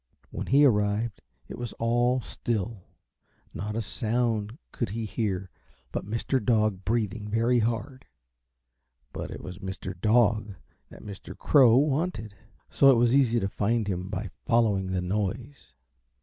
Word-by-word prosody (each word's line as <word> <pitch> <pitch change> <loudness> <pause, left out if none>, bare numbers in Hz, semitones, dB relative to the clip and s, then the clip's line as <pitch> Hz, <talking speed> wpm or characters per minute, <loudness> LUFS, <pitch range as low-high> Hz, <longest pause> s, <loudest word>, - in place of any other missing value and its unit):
When - - -5
he 140 +3 +5
arrived 105 -2 +1 0.3
it - - -8
was 120 -1 -5
all 120 +2 +1
still; 110 -3 -4 0.7
not 105 +5 -4
a 115 - -1
sound 115 0 -1
could 120 - -3
he 110 +3 -3
hear 95 -4 -3 0.4
but - - -4
Mr. 115 +3 -1
Dog 105 -4 +1
breathing 110 -1 -1
very 115 +3 +2
hard, 120 +4 -2 1.1
but - - -5
it - - -8
was 90 -1 -8
Mr. 95 0 -5
Dog 110 -2 +2 0.3
that - - -13
Mr. 100 -2 -9
Crow 125 -5 +5
wanted, 140 - 0 0.3
so 135 - +5
it 135 - +7
was 120 +2 +3
easy 120 -4 +3
to 95 - 0
find 105 +2 0
him 90 -1 -3
by 100 -1 -4
following 105 -5 +2
the 95 -1 -1
noise. 105 +9 -3
110 Hz, 145 wpm, -27 LUFS, 100-120 Hz, 1.1 s, it